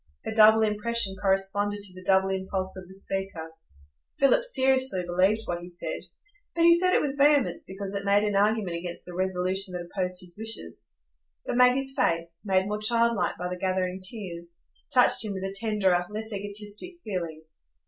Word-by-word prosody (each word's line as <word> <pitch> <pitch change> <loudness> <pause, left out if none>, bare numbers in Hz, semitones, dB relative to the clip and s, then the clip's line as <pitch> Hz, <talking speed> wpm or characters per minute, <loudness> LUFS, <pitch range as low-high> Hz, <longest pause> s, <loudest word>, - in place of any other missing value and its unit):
Her - - -3
double 220 0 +6
impression 210 -1 +1
corresponded 195 +1 0
to 200 -2 -4
the 185 0 -12
double 190 0 +3
impulse 190 0 -3
of 185 -1 -9
the 190 - -13
speaker. 195 -4 -4 0.7
Philip 275 - +4
seriously 265 - +2
believed 185 +5 +2
what 175 0 -3
he 175 - -9
said, 175 -1 -5 0.6
but 335 - +2
he 340 0 +6
said 365 0 +2
it - - +4
with 285 -1 -3
vehemence 290 -2 +3
because 195 +1 -6
it 200 0 -3
made 200 +1 +3
an 205 -1 0
argument 205 -3 +1
against 170 0 -7
the 180 - -9
resolution 185 +1 -1
that 175 -1 -5
opposed 180 0 -2
his 180 -1 -10
wishes. 220 - -6 0.5
But - - -2
Maggie's 260 +2 +4
face, 165 0 0
made 190 -1 +2
more 210 0 -2
childlike 230 0 +1
by 180 - -4
the 180 - -4
gathering 185 0 -1
tears, 175 -5 -7 0.3
touched 250 -2 +5
him 210 -2 -2
with 190 -1 -5
a 195 0 -4
tenderer, 195 -5 +1
less 215 +1 -4
egotistic 205 - -4
feeling. 170 -6 -5
195 Hz, 180 wpm, -27 LUFS, 185-220 Hz, 0.7 s, double